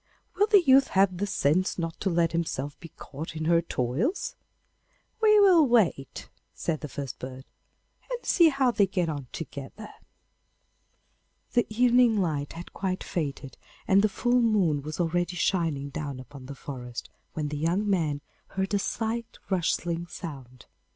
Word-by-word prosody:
'Will 415 - +2
the 410 -4 +6
youth 270 -2 +6
have 190 -1 +2
the 205 +3 -1
sense 185 -2 +1
not 165 -2 -4
to 195 - 0
let 170 -1 +2
himself 145 -4 -2
be 165 - -10
caught 155 +2 -8
in 155 0 -3
her 170 0 +4
toils?' 165 - -2 0.9
'We 425 -1 +6
will 355 -7 +6
wait,' 200 - +1 0.3
said 160 -3 -2
the 150 - -4
first 140 -2 -6
bird, 130 +1 -8 0.6
'and - - -5
see 340 -3 +5
how 270 -3 +2
they 205 -4 +3
get 180 -3 -1
on 145 -4 -5
together.' 165 +7 -8 1.6
The 240 - +2
evening 240 0 +4
light 150 -6 -1
had 170 +1 -9
quite 185 -1 -2
faded, 140 -5 -4 0.3
and 195 +1 +5
the 215 - +3
full 245 +5 +2
moon 195 -11 +2
was 155 +4 -6
already 175 +1 0
shining 165 -6 0
down 140 -2 -5
upon 130 0 -11
the 140 - -7
forest, 125 -4 -7 0.2
when 150 -2 -2
the 150 - -4
young 175 +7 0
man 160 -7 0 0.3
heard 190 +1 -3
a 200 - +3
slight 225 +3 -3
rustling 170 -1 0
sound. 135 -8 -9
170 Hz, 160 wpm, -27 LUFS, 145-215 Hz, 1.6 s, the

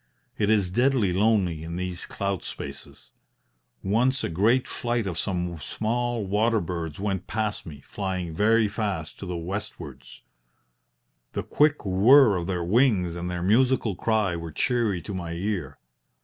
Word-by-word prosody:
It 105 -1 +2
is 100 -5 +2
deadly 120 -3 +2
lonely 95 -5 +2
in 85 +1 -6
these 90 -1 -4
cloud 100 -2 -2
spaces. - - -8 0.7
Once 125 +7 +1
a - - -1
great 110 +10 +2
flight 120 -2 -2
of 90 -4 -3
some 90 -4 -2
small 115 - -2
water 110 +4 +2
birds 85 -3 -4
went 95 -2 -2
past 105 -3 -2
me, 75 -3 -9
flying 95 -1 -4
very 110 +5 +3
fast 100 -6 -4
to 95 - -7
the 90 -1 -3
westwards. 100 +6 -7 1.1
The - - -2
quick 150 -4 +2
whirr 105 +5 +6
of 85 -1 -3
their 90 -3 -1
wings 100 -3 +2
and 85 +1 -4
their 90 -1 -3
musical 115 +1 +2
cry 105 -2 +1
were 85 -1 -6
cheery 110 - 0
to 100 - -6
my 85 -3 -4
ear. 95 +2 -3
100 Hz, 150 wpm, -26 LUFS, 90-110 Hz, 1.1 s, whirr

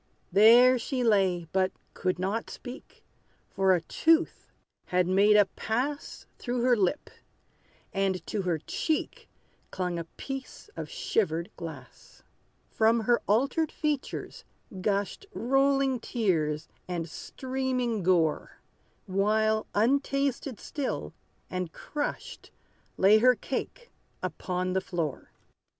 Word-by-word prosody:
There 240 +5 +7
she 255 +1 -2
lay, 190 -6 +2
but 185 0 +2 0.2
could 185 -1 -1
not 195 +5 -2
speak; 255 +2 -10 0.5
For 190 -1 +3
a 175 - -1
tooth 325 - +1 0.3
had 180 0 +1
made 200 +3 +5
a 205 - +6
pass 255 +9 -3
Through 245 0 -2
her 250 -1 +5
lip; 205 +7 0 0.8
and 195 -2 0
to 210 - -2
her 180 -3 0
cheek 310 - -3 0.4
Clung 180 -2 -2
a 165 - -5
piece 270 +9 -7
of - - -6
shivered 180 - -1
glass. 150 -7 -10 0.5
From 225 +1 +3
her 235 +2 +2
altered 275 - +2
features 300 -3 -3 0.4
gushed 200 - -1
Rolling 270 +1 +2
tears, 165 - -1 0.2
and 175 -2 -3
streaming 255 - -2
gore; 170 -4 +1 0.5
While, 215 +3 +1
untasted 275 +2 +1
still, 285 -3 -4 0.3
and 185 -2 -4
crushed, 295 -1 -5 0.5
Lay 205 +3 +6
her 250 +2 +5
cake 470 - -5 0.3
upon 185 0 -2
the 190 - +1
floor. 170 -6 -4
215 Hz, 110 wpm, -28 LUFS, 185-260 Hz, 0.8 s, There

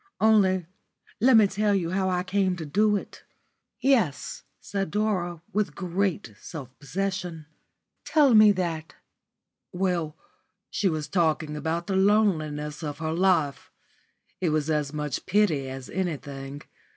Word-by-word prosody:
Only 195 -5 +4 0.5
let 250 0 +6
me 215 - +7
tell 205 +1 +1
you 170 -3 -1
how 190 0 0
I 180 -1 0
came 190 0 +1
to 165 -3 -6
do 210 +8 +2
it." 200 - -6 0.6
"Yes," 230 - +1 0.2
said 195 -2 -3
Dora, 180 -5 -1
with 210 +1 0
great 180 - -2
self 135 -7 -9
possession, 180 +1 -3 0.6
"tell 290 -5 +4
me 215 -1 +8
that." 165 -4 -3 0.8
"Well, 175 -4 -1 0.5
she 195 - +1
was 155 -3 -3
talking 160 -4 0
about 160 +3 -2
the 195 - -2
loneliness 160 -8 +1
of 145 -3 -4
her 160 +1 -2
life. 165 -6 +1 0.7
It 180 - +1
was 155 0 0
as 150 -2 0
much 150 -3 -4
pity 180 -9 +2
as 130 -1 -7
anything. 145 -5 -5
175 Hz, 135 wpm, -26 LUFS, 150-195 Hz, 0.8 s, me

